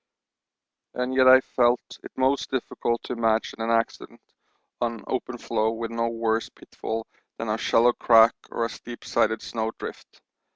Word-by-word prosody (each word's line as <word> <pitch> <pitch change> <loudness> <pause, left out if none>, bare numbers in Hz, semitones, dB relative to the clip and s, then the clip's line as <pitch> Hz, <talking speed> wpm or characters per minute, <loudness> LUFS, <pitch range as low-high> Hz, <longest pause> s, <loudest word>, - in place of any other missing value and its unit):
And 125 +1 -2
yet 130 0 +5
I 130 0 +9
felt 120 -1 +2 0.2
it - - -10
most 130 +1 +1
difficult 120 -2 -2
to - - -4
imagine 115 -1 0
an 115 - -1
accident 115 0 -1 0.6
on 115 -2 -2
open 125 -1 -3
floe 110 -1 0
with 115 0 -5
no 115 0 -1
worse 115 -1 -1
pitfall 115 0 -6 0.3
than 115 - -4
a 110 - 0
shallow 120 +2 +4
crack 115 -1 +6 0.2
or 115 - -1
steep 120 0 -10
sided 110 0 +1
snow 110 -1 -2
drift. - - -9
115 Hz, 155 wpm, -25 LUFS, 115-125 Hz, 0.6 s, I